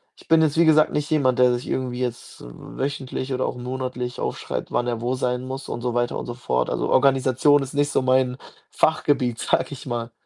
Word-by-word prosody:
ich - - -20
bin 165 0 +5
jetzt 155 0 +1
wie 170 - +5
gesagt 155 -1 +5
nicht 150 0 -1
jemand, 130 -6 +2
der 125 0 +6
sich 120 - -6
irgendwie 125 -1 -2
jetzt 120 -2 -5
wöchentlich 130 - -5
oder 130 0 0
auch - - -4
monatlich 125 0 -4
aufschreibt, - - -4
wann 120 - 0
er 120 -2 -2
wo 125 +2 -1
sein 125 -1 -1
muss 135 +1 -6
und - - -4
so 120 -1 -2
weiter 120 0 0
und - - -7
so 120 - -5
fort. 65 - -1
Also, - - -1
Organisation 135 +1 +4
ist 135 - -8
nicht 145 0 +1
so - - +2
mein 130 0 +2 0.3
Fachgebiet, 145 -6 +1
sage - - +1
ich 140 - -8
mal. 120 -1 -3
130 Hz, 215 wpm, -23 LUFS, 125-140 Hz, 0.3 s, der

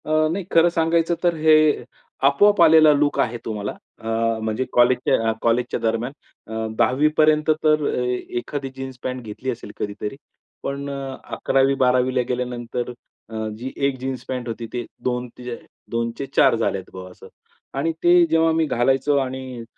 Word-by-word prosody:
अ, 155 0 +2
नाही 190 +3 -2
खरं 165 +1 +5
सांगायचं 165 0 +1
तर 175 -1 +3
हे 155 -1 +4 0.4
आपोआप 200 +8 +4
आलेला 160 -2 +7
लूक 145 0 +1
आहे 120 0 +1
तो 110 - -3
मला. 105 -1 -4 0.3
अ, 110 - -9 0.3
म्हणजे 110 +3 -1
कॉलेजच्या 120 -2 +3
अ, - - +1
कॉलेजच्या 120 +2 +1
दरम्यान 115 +3 -1 0.4
अ, 110 0 -2
10वी 135 +4 +3
पर्यंत 155 0 +4
तर 155 -1 +3 0.4
एखादी 135 +3 -4
जीन्स 135 -1 -7
पँट 130 0 -3
घेतली 115 +3 -6
असेल 115 -3 -8
कधीतरी. 105 +3 -4 0.5
पण 140 +1 -4
अ, 135 -1 -5 0.2
11वी-12वी 130 -1 +2
ला 125 - +3
गेल्यानंतर 125 -1 -3 0.4
अ, 110 -1 -4
जी 130 +4 -6 0.2
1 135 -1 -3
जीन्स 130 -1 -4
पँट 125 -2 -3
होती. 115 0 -5
ती 120 -1 -3 0.2
2, 125 0 -2 0.6
2 115 0 -1
चे 140 - -3
4 - - +5
झालेत - - -2
बा 95 0 -8
असं. - - -14 0.5
आणि 160 +4 +1
ते 175 0 +6
जेव्हा 165 0 +3
मी 160 0 +2
घालायचो 135 +2 +1
आणि 130 -2 -4
130 Hz, 160 wpm, -22 LUFS, 120-155 Hz, 0.6 s, आलेला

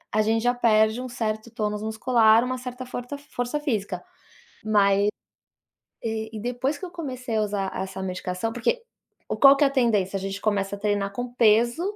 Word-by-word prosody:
a 215 - +4
gente 225 +1 +1
já 245 0 +3
perde 220 -1 +3
um 255 - -6
certo 220 -1 -3
tônus 210 -2 -2
muscular, 220 +1 +4
uma 255 0 -2
certa 250 0 -7
forta 245 +3 -6
força 285 -1 -4
física, 205 - -2 0.6
mas 200 -1 +3 0.9
e 220 -1 -4
depois 250 +5 -2
que - - -7
eu - - -10
comecei 255 -8 -4
a 215 - +2
usar 200 -2 -2
essa 190 0 -5
medicação, 185 +3 -3
porque 365 - 0 0.6
qual 275 0 +9
que 290 - +4
é - - +6
a 275 - +1
tendência? 215 -8 +1
A 195 - -2
gente 195 +1 -4
começa 200 -2 0
a - - -13
treinar 205 -1 -1
com 245 +3 -5
peso, 235 +6 +4
225 Hz, 180 wpm, -25 LUFS, 205-250 Hz, 0.9 s, qual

